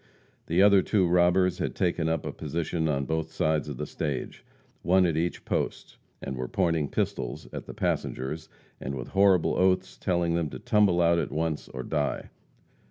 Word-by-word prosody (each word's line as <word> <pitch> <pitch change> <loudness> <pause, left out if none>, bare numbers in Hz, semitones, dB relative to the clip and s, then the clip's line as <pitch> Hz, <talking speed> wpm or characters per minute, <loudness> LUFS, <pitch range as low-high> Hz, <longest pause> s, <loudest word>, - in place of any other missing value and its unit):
The 85 +4 +3
other 100 -1 +6
two 95 -1 +2
robbers 90 +1 +3
had - - -2
taken 85 -2 0
up 80 - -1
a - - -3
position 80 0 -2
on 70 -3 0
both 80 +1 -2
sides 80 -1 0
of 70 - -6
the - - -3
stage 75 -5 -4 0.4
one 90 +2 +4
at 85 -3 +1
each 85 +2 -2
post, - - -3 0.3
and 65 - -4
were 65 0 -4
pointing 80 -2 0
pistols - - -3
at - - -6
the - - -8
passengers, 75 +5 -2 0.3
and 70 +1 -4
with 60 -2 -6
horrible 95 -3 +4
oaths 95 0 +1
telling 85 -2 0
them 85 -3 0
to - - -7
"tumble 100 -5 +3
out" 85 0 +4
at - - -3
once, 80 -1 -2
or 65 -1 -6
die. 75 0 -2
85 Hz, 180 wpm, -27 LUFS, 75-90 Hz, 0.4 s, other